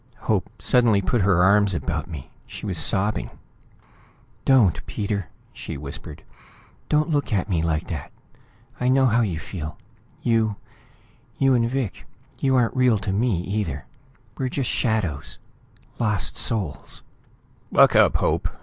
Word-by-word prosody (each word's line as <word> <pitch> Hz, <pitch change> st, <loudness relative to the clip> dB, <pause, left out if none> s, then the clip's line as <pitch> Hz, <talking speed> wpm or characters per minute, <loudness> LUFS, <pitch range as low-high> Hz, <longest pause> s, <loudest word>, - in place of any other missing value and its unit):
Hope -, -, 0 dB
suddenly 120 Hz, -5 st, +3 dB
put 105 Hz, +4 st, 0 dB
her 90 Hz, -2 st, +4 dB
arms 100 Hz, 0 st, +4 dB
about 70 Hz, +2 st, -3 dB
me. 80 Hz, -6 st, -9 dB, 0.2 s
She -, -, -8 dB
was -, -, +2 dB
sobbing. 105 Hz, +3 st, +1 dB, 1.2 s
"Don't, 105 Hz, -, +4 dB
Peter!" 100 Hz, -3 st, -3 dB, 0.3 s
she -, -, -7 dB
whispered. 70 Hz, 0 st, -8 dB, 0.7 s
"Don't 155 Hz, +2 st, +2 dB
look 145 Hz, -3 st, 0 dB
at 100 Hz, -2 st, 0 dB
me 90 Hz, -6 st, 0 dB
like 80 Hz, -1 st, -1 dB
that. 80 Hz, -7 st, -5 dB, 0.7 s
I 125 Hz, -, +1 dB
know 135 Hz, +1 st, +4 dB
how 120 Hz, -1 st, +3 dB
you 95 Hz, -8 st, -1 dB
feel. 80 Hz, -2 st, -6 dB, 0.5 s
You 115 Hz, -3 st, +2 dB, 0.8 s
you 135 Hz, -1 st, +3 dB
and 115 Hz, -2 st, +2 dB
Vic 130 Hz, -5 st, -3 dB, 0.3 s
you 135 Hz, -1 st, +2 dB
aren't 120 Hz, -1 st, +2 dB
real 125 Hz, -3 st, +4 dB
to 95 Hz, -1 st, -3 dB
me, 105 Hz, -4 st, +1 dB
either! 100 Hz, +3 st, -3 dB, 0.5 s
We're 130 Hz, -1 st, 0 dB
just 130 Hz, -1 st, -1 dB
shadows 100 Hz, -, -1 dB, 0.6 s
lost 105 Hz, -5 st, 0 dB
souls...." 100 Hz, -10 st, -3 dB, 0.7 s
"Buck -, -, +6 dB
up, -, -, +5 dB
Hope!" -, -, +1 dB
105 Hz, 140 wpm, -23 LUFS, 90-125 Hz, 1.2 s, Buck